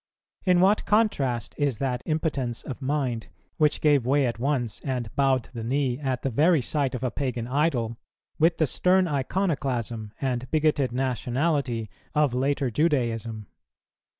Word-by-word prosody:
In 180 -1 +4
what 200 +3 +3
contrast 135 - +1
is 140 -5 +1
that 125 -1 -1
impotence 150 -7 -1
of 135 0 -7
mind 130 -4 -1 0.3
which 150 -1 +2
gave 145 -4 +4
way 135 +3 +2
at 115 -2 -2
once, 125 -4 -1
and 125 -5 -4
bowed 135 -3 +2
the 115 -2 -5
knee, 130 +1 0
at 130 -4 -2
the 135 - 0
very 160 +7 +4
sight 135 0 -1
of 125 - -5
a 125 - 0
pagan 125 -3 -2
idol, 125 -5 0 0.4
with 165 +2 +4
the 160 - +3
stern 185 +5 +2
iconoclasm 135 - -1
and 130 -2 -2
bigoted 150 -5 +2
nationality 130 -1 -1 0.3
of 150 -4 +3
later 135 0 0
Judaism! 115 -7 0
135 Hz, 150 wpm, -26 LUFS, 120-150 Hz, 0.4 s, In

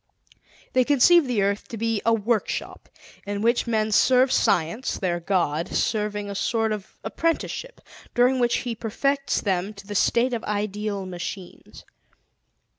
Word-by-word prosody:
They 255 - +4
conceive 290 +4 +5
the 230 -5 +1
earth 200 +1 -1
to 230 - -7
be 225 -1 -1
a 230 - +3
workshop 225 0 -2 0.4
in 205 +1 -3
which 235 +1 +2
men 220 -2 0
serve 255 +4 +4
Science, 175 +10 +1
their 175 -3 -1
God, 170 -2 0
serving 210 -1 -1
a 200 - -5
sort 225 +2 0
of 210 -3 -6
apprenticeship 335 +9 -2 0.3
during 250 +2 +3
which 240 -1 +2
He 240 - -2
perfects 275 +5 -1
them 195 +1 -1
to 200 0 -12
the 205 - -6
state 240 +5 +2
of 230 - -3
ideal 210 -1 -3
machines. 180 0 -8
215 Hz, 145 wpm, -24 LUFS, 200-245 Hz, 0.4 s, conceive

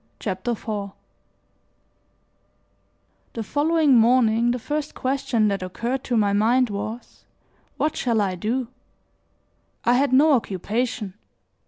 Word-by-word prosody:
CHAPTER 195 +4 -2
IV 205 -3 -5 2.4
THE 225 - -4
following 295 +4 +2
morning 235 0 +4
the 245 - 0
first 295 +4 -4
question 260 -4 0
that 200 -1 -2
occurred 235 +8 -3
to 240 - 0
my 205 -2 +2
mind 235 +3 +2
was: 215 +4 -7 0.5
"What 305 - 0
shall 235 -3 0
I 195 -3 0
do?" 230 +7 -2 1.2
I 240 - +4
had 270 +2 +2
no 290 +4 +5
occupation. 225 0 -2
235 Hz, 115 wpm, -23 LUFS, 210-260 Hz, 2.4 s, no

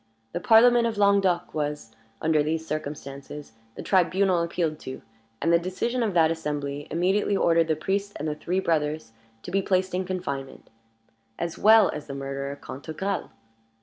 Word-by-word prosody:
The 175 - -3
Parliament 235 +4 +5
of 225 -2 -3
Languedoc 200 -3 +2
was, 150 -6 -3 0.3
under 155 -1 +3
these 160 +2 -1
circumstances, 145 -2 -6 0.2
the - - -7
tribunal 185 -1 +2
appealed 165 -2 -2
to; 130 - -8 0.4
and 165 - +2
the 170 - +5
decision 185 +8 -2
of 215 -5 -1
that 160 -1 +5
assembly 145 -2 -4
immediately 190 +4 +1
ordered 165 -2 +3
the 160 - +1
priest 200 +5 -2
and 150 - -4
the 150 - -1
three 175 +5 -2
brothers 155 -8 -1 0.3
to - - -7
be 195 - +2
placed 185 -1 0
in 185 +1 0
confinement, 155 -8 -5 0.7
as 170 -1 -4
well 220 -2 +7
as 150 - -6
the 140 - -6
murderer 140 0 -4
Cantegrel. 160 +9 -4
165 Hz, 160 wpm, -26 LUFS, 150-190 Hz, 0.7 s, well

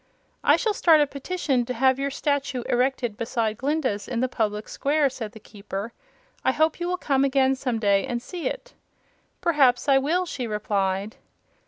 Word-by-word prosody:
"I - - +6
shall 445 -4 0
start 330 -5 +5
a 295 - +5
petition 280 -2 -1
to 250 - -4
have 260 +2 +3
your 280 0 0
statue 280 -2 -1
erected 245 -3 0
beside 225 -2 -2
Glinda's 265 -7 -1
in 245 -2 -2
the 255 - +1
public 215 -4 -2
square," 285 -1 +1
said 225 -5 -6
the 220 - -11
Keeper. 205 +1 -7 0.5
"I - - +3
hope 315 +1 +1
you 345 - -2
will 360 0 -1
come 275 -5 +1
again, 270 -1 +3
some 255 -3 -2
day, 200 -3 +2
and 240 - -2
see 340 +8 -5
it." - - -6 0.7
"Perhaps 275 -7 +3
I 270 -1 +5
shall," 345 +6 +1
she 255 -8 -4
replied. 205 -1 -1
260 Hz, 180 wpm, -25 LUFS, 225-290 Hz, 0.7 s, I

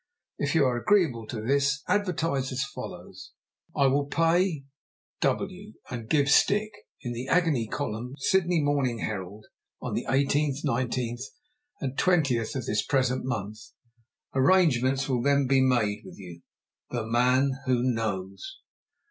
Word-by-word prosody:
If 145 +2 -1
you 150 -4 +5
are 125 -2 +1
agreeable 125 - +2
to 110 -2 -5
this, 140 +4 +1
advertise 165 -9 0
as 130 +1 -1
follows, 95 -7 -9 0.4
'I 140 - +3
will 140 +2 +2
Pay 165 0 +1 0.6
W., 195 +2 -2 0.2
and 115 -3 -6
give 145 -3 +3
stick!' 210 +9 +3 0.3
in 120 -3 -4
the 120 +2 -5
agony 155 -10 +2
column 125 0 -4
Sydney 180 -4 +2
Morning 140 -5 +1
Herald, 105 -1 -5 0.3
on - - -5
the - - -3
18th, 140 +2 +1
19th, 120 0 -1 0.6
and 135 -1 -3
20th 140 -12 +2
of 130 -3 -3
this 105 0 0
present 130 -2 0
month. 110 -4 -4 0.7
Arrangements 135 -3 +3
will 125 -3 0
then 140 +1 +3
be 135 +1 +3
made 110 -5 +1
with - - -12
you. 85 -3 -11 0.5
"THE 120 -3 -3
MAN 125 +4 +3 0.2
WHO 125 -2 +2
KNOWS." 100 -6 -3
130 Hz, 140 wpm, -27 LUFS, 115-145 Hz, 0.7 s, you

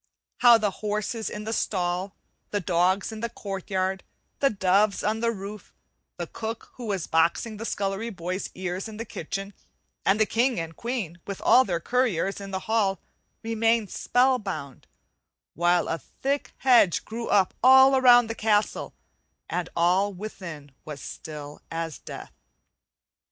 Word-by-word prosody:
How 240 -2 +7
the 210 -2 0
horses 215 +2 -2
in 210 - -6
the 220 +1 -3
stall, 185 -2 -1 0.3
the 205 - -1
dogs 185 +3 +1
in 220 - -7
the 235 +1 -2
court 195 -4 -6
yard, 190 0 -1 0.4
the 275 - +4
doves 200 0 +2
on 215 +1 0
the 230 0 +1
roof, 205 -1 -7 0.5
the - - -3
cook 225 +1 -6
who 245 -2 -8
was 195 -5 -1
boxing 170 +7 +1
the 225 - -6
scullery 200 +2 -2
boy's 185 -1 -4
ears 185 +2 -4
in 215 -1 -9
the 230 - -5
kitchen, 195 +1 -5 0.5
and 200 +2 +3
the 215 - +5
king 240 +2 +1
and 165 0 -5
queen 225 -9 -4
with 200 -1 -5
all 260 - +6
their 175 -3 -1
courtiers 200 -4 0
in 195 - -7
the 190 -1 -3
hall 205 -5 +1 0.4
remained 225 -1 +1
spell 255 +1 +2
bound, 155 - -6 0.7
while 175 +1 +2
a 165 - -2
thick 275 - -3
hedge 195 - +4
grew 230 +1 -5
up 195 -3 +3
all 265 +1 +7
round 245 -2 +7
the 225 - -3
castle 215 -2 0 0.6
and 180 -1 -2
all 180 +4 +3
within 175 -7 -8
was 150 -2 -7
still 150 -1 -8
as 165 -2 -4
death. - - -9
200 Hz, 155 wpm, -26 LUFS, 180-225 Hz, 0.7 s, How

